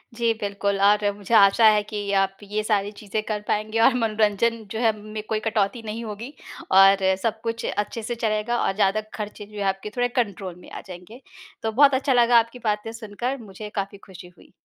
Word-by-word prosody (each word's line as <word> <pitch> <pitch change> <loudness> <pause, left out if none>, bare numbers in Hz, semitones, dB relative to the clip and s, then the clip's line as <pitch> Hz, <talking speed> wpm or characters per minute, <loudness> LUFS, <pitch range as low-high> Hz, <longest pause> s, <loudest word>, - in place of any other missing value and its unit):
जी, 230 -1 +1
बिल्कुल 200 -2 -2
और 205 +1 +5 0.2
मुझे 205 +2 -6
आशा 200 +2 +6
है 210 -1 +3
कि 205 -2 -3
आप 195 0 0
ये 210 +1 -2
सारी 205 -2 0
चीज़ें 210 +1 -4
कर 215 -1 -3
पाएँगे 215 +2 -1
और 230 +3 +5
मनोरंजन 225 0 +1
जो 220 - -3
है 230 -2 +3
में 215 0 -6
कोई 220 -1 0
कटौती 215 +1 -1
नहीं 220 +2 -5
होगी 220 +6 -7 0.4
और 195 0 +8 0.3
सब-कुछ 230 +1 -2
अच्छे 210 +2 -3
से 240 +2 -3
चलेगा 220 +1 -1
और - - +1
ज़्यादा 205 +1 +2
ख़र्चे 210 -1 -6
जो 210 +1 -13
हैं 200 - -2
आपके 195 +2 -4
थोड़े 245 0 +2
कंट्रोल 200 -7 -2
में - - -14
आ - - -7
जाएँगे। 185 +7 -11 0.4
तो 220 - 0
बहुत 280 +5 +5
अच्छा 265 +1 +1
लगा 240 -1 +6
आपकी 230 +2 -4
बातें 210 0 -1
सुनकर 230 +4 -4
मुझे 210 0 -9
काफ़ी 200 0 -3
खुशी 185 -2 -11
हुई। - - -20
215 Hz, 200 wpm, -24 LUFS, 200-230 Hz, 0.4 s, और